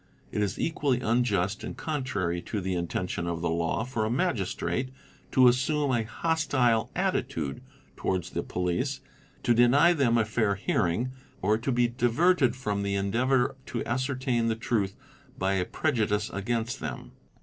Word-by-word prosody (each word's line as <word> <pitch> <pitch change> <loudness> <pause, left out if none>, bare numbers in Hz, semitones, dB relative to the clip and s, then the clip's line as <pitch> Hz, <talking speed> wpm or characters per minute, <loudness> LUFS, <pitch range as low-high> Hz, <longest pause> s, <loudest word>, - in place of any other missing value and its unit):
It 105 - -1
is 100 -2 -1
equally 145 -6 +1
unjust 105 -5 +1
and - - -6
contrary 100 - -2
to 105 - -4
the 95 0 -2
intention 90 0 -2
of 85 -1 -2
the 85 - 0
law 85 +5 0
for 120 -3 -2
a 110 - 0
Magistrate 130 - -1 0.4
to 130 -1 +6
assume 140 +3 +2
a 120 -2 +2
hostile 130 -3 +1
attitude 70 -4 -1 0.3
towards 95 -2 -2
the - - -1
police, 90 +10 -2 0.4
to 120 - +4
deny 130 +8 +5
them 130 -7 +2
a 110 - +3
fair 110 -2 +1
hearing, 100 +5 0 0.3
or 105 +3 +4
to 130 +4 -1
be 120 -1 +3
diverted 130 +3 +2
from 105 -6 -2
the 100 0 -1
endeavour 125 +7 +1
to 120 - -3
ascertain 130 -1 0
the 110 - +1
truth 110 -4 -1 0.4
by 95 +1 +1
a 95 -2 +1
prejudice 105 - 0
against 115 +4 -2
them." - - -6
115 Hz, 155 wpm, -28 LUFS, 100-130 Hz, 0.4 s, to